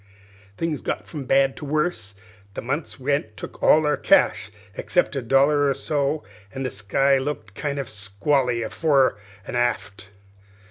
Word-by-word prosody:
"Things 165 -4 -2
got - - -3
from 150 -4 -6
bad 135 +1 +3
to - - -9
worse; 145 - -1 0.4
the - - -4
month's 140 +4 -3
rent 130 -6 -1
took - - -9
all 155 0 +5
our 150 0 +2
cash 95 - +3 0.2
except 175 - 0
a 135 - -1
dollar 140 +4 +3
or 135 - 0
so, 145 0 -1 0.3
an' 135 - -3
the 130 - -2
sky 135 +8 +2
looked 135 -7 -5
kind 145 +6 -3
o' 140 - -1
squally 115 +4 -1
fore 135 -9 +2 0.3
an' - - -6
aft. 100 -5 -2
135 Hz, 155 wpm, -23 LUFS, 115-145 Hz, 0.4 s, all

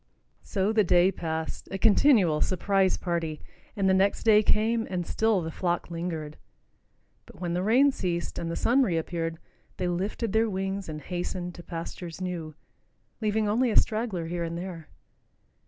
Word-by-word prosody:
So 200 +1 -1
the 215 -1 +4
day 180 +1 +4
passed, 160 -3 -4
a 195 - -3
continual 205 - +4
surprise 190 +1 +2
party, 165 -4 -2 0.4
and 195 -3 +1
the 190 - +4
next 195 +1 +2
day 215 -2 +6
came, 225 +2 +1
and 180 -2 -2
still 220 -1 +1
the 160 0 -4
flock 175 0 -2
lingered. 165 -3 -4 0.9
But - - -15
when 175 -2 -2
the 180 - 0
rain 250 +8 +4
ceased, 175 -8 -3
and 165 - -3
the 165 - -3
sun 255 +4 +3
reappeared, 165 -5 -1 0.4
they 180 - -1
lifted 195 +5 -2
their 220 0 +3
wings 195 -1 -3
and 150 -1 -6
hastened 180 +2 -4
to 175 - -10
pastures 170 0 -7
new, 170 -4 -4 0.7
leaving 215 0 +1
only 235 +4 +2
a 215 - +2
straggler 215 -6 +1
here 170 +1 -3
and 170 0 -4
there. 175 -3 -7
185 Hz, 165 wpm, -27 LUFS, 170-210 Hz, 0.9 s, day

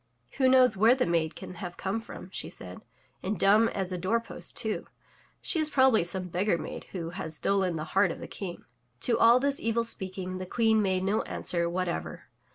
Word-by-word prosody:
"Who 260 -1 +5
knows 255 -3 +5
where 225 +5 +5
the 260 - +1
maid 165 -2 0
can - - -8
have 180 -2 -6
come 195 +3 -2
from?'* 225 -4 -10
she - - -4
said, 90 0 -9 0.4
and 195 +2 -2
dumb 210 +5 +5
as 190 -2 -2
a 180 - -3
door 200 +6 +1
post, 230 - -4
too! - - -2 0.6
She 330 - 0
is 310 -1 +1
probably 260 - +4
some 180 +1 -3
beggar 180 +1 +1
maid - - -7
who 170 -3 -6
has 165 -4 -4
stolen 190 -3 +1
the 155 - -3
heart 195 -1 +4
of - - -5
the - - -7
King!'' 180 -4 -7 0.4
To 240 - +2
all 235 +2 +7
this 280 +1 0
evil 230 +1 0
speaking 185 -4 -3
the 185 - -6
Queen 220 +1 +3
made 185 -2 +1
no 200 +3 +1
answer 170 -1 0
what 185 +1 -1
ever. 170 - -4
195 Hz, 210 wpm, -28 LUFS, 180-230 Hz, 0.6 s, all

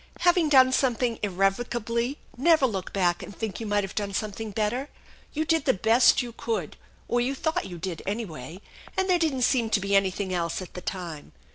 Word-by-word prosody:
Having 350 -3 +4
done 260 -2 +6
something 245 -3 +1
irrevocably, 230 +6 0 0.2
never 310 +2 +4
look 195 -7 -3
back 175 -3 +1
and 200 - -9
think 220 -3 -4
you 225 - -5
might 205 0 +1
have 195 - -6
done 200 -2 -3
something 215 +1 -3
better. 220 +7 -1 0.4
You 315 +1 -1
did 325 0 +1
the 260 - +3
best 230 +6 +4
you 240 - -7
could, 220 -8 -3 0.3
or 240 0 +1
you 265 +3 -1
thought 315 -5 -1
you 175 -2 -8
did, 170 -1 -5
anyway; 185 - -5 0.4
and 380 0 +1
there 360 -2 +3
didn't 285 -6 +1
seem 240 -3 +2
to 220 - +2
be 200 +1 0
anything 190 0 +1
else 170 -2 -1
at 185 - -9
the 180 - -7
time. 170 -6 -6
220 Hz, 195 wpm, -26 LUFS, 195-260 Hz, 0.4 s, done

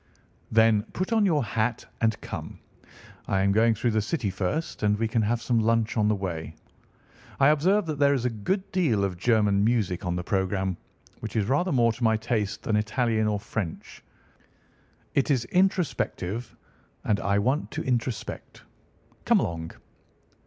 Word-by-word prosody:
"Then 110 -1 +5
put 185 +5 -2
on 215 -3 +4
your 155 -6 +2
hat 110 +1 -1 0.2
and 110 -1 +1
come. - - -7 0.7
I 95 -1 +1
am 100 - +3
going 110 +2 +3
through 120 +3 0
the 110 0 +1
City 110 - -2
first, 95 - -3
and 105 -1 +2
we 115 +1 0
can 110 +1 +1
have 115 +2 0
some 120 -2 +2
lunch 115 0 +1
on 105 -2 +2
the 105 - +2
way. 85 -5 -5 0.8
I 135 +1 +6
observe 180 +7 +3
that 155 -3 -4
there 140 0 +4
is 125 -2 -2
a 125 - +1
good 185 - -2
deal 140 - +1
of 95 -2 -1
German 105 -2 +3
music 105 -5 0
on 90 -1 -1
the 90 - -3
programme, 95 -1 -1 0.4
which 110 0 -7
is 105 -3 +2
rather 145 - +1
more 120 -4 +3
to 120 - -7
my 110 -1 +3
taste 110 -3 -2
than 110 -2 +1
Italian 110 +1 0
or 105 -1 0
French. 100 -4 -5 1.1
It 140 - +1
is 130 -5 +2
introspective, 135 - -1 0.5
and 105 -2 +1
I 100 0 +1
want 130 +9 0
to 160 - -4
introspect. 125 -3 -3 0.6
Come - - +4
along!" 80 -1 -3
110 Hz, 170 wpm, -26 LUFS, 100-130 Hz, 1.1 s, I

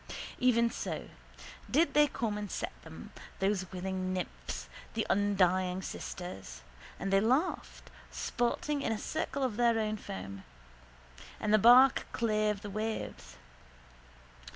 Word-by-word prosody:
Even 235 -2 +4
so - - -4 0.6
did 320 +6 +3
they 295 0 +6
come 225 -6 -2
and 210 -1 -4
set - - -3
them, - - -11 0.3
those 195 -2 0
willing 185 0 -3
nymphs, 65 - -5 0.3
the - - 0
undying 185 -2 +2
sisters. 95 - -7 0.4
And 195 +1 -2
they 195 - +6
laughed, 260 - 0 0.2
sporting 280 +4 -1
in 225 - -1
a 220 - 0
circle 280 +2 -2
of 240 -5 -1
their 235 -1 +4 0.2
foam: 95 - -7 1.0
and 210 0 0
the 215 - +7
bark 245 +4 +7
clave 215 -2 +1
the 205 - -6
waves. 215 +2 -4
210 Hz, 125 wpm, -32 LUFS, 185-235 Hz, 1.0 s, the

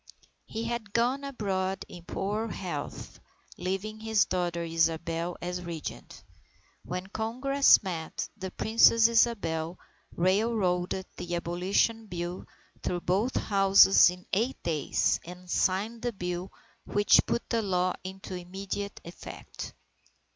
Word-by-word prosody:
He 225 - -4
had 230 -3 -4
gone 250 +4 +1
abroad 195 -8 -2
in 175 - -11
poor 210 +5 -2
health, 175 -9 -6 0.4
leaving 195 +4 -3
his 220 -1 +2
daughter 175 -2 -1
Isabel 165 +1 0
as 180 0 -3
Regent. 170 -3 -7 0.6
When 180 +1 -4
Congress 250 +7 +3
met, 165 -4 -4
the 190 -3 -5
Princess 225 +3 +5
Isabel 185 -8 +1 0.4
railroaded 185 -1 +1
the 175 0 -3
Abolition 185 +6 0
Bill 175 -1 -5 0.3
through 175 -1 -2
both 200 +9 0
Houses 195 -2 +6
in 180 0 -8
eight 230 +7 +1
days, 155 -4 +1
and 180 +1 -11
signed 200 +6 0
the 240 -1 -2
bill 180 -1 -4 0.3
which 205 -1 +5
put 235 - -1
the 230 -1 +2
law 185 -3 +1
into 190 0 -7
immediate 195 +3 -5
effect. 170 - -9
190 Hz, 120 wpm, -29 LUFS, 175-220 Hz, 0.6 s, Houses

